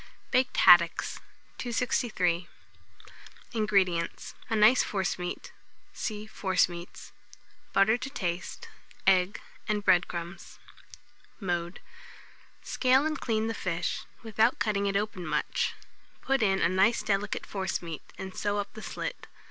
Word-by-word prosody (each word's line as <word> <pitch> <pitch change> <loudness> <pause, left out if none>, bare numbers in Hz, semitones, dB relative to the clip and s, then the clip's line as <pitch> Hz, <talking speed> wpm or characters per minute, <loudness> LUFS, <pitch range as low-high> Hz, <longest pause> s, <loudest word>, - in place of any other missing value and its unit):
BAKED 255 0 +2
HADDOCKS. 175 -1 +6 0.5
263. 220 -8 0 1.1
INGREDIENTS. 195 -6 0 0.2
A 225 - +1
nice 220 +4 +6
forcemeat 180 -2 -3 0.4
(see 215 -1 -4
Forcemeats), 180 -4 -1 0.6
butter 220 +4 +4
to 255 +2 -5
taste, 175 -9 -4 0.4
egg 190 +1 +3 0.3
and 210 -1 0
bread 175 -1 +5
crumbs. 170 +2 -7 0.8
Mode. 175 -2 -2 0.8
Scale 260 +2 +3
and 310 0 -2
clean 220 -2 0
the 225 - -1
fish, 180 -5 -2 0.2
without 225 +2 +2
cutting 205 -1 0
it 195 0 +1
open 200 -3 -3
much; - - -1 0.5
put 270 -1 +1
in 195 -3 +2
a - - +5
nice 190 +6 +3
delicate 200 0 -1
forcemeat, 175 -4 -4 0.2
and 190 -1 -7
sew 205 -1 -1
up 205 0 -3
the 220 - -9
slit. - - -5
200 Hz, 115 wpm, -29 LUFS, 180-220 Hz, 1.1 s, HADDOCKS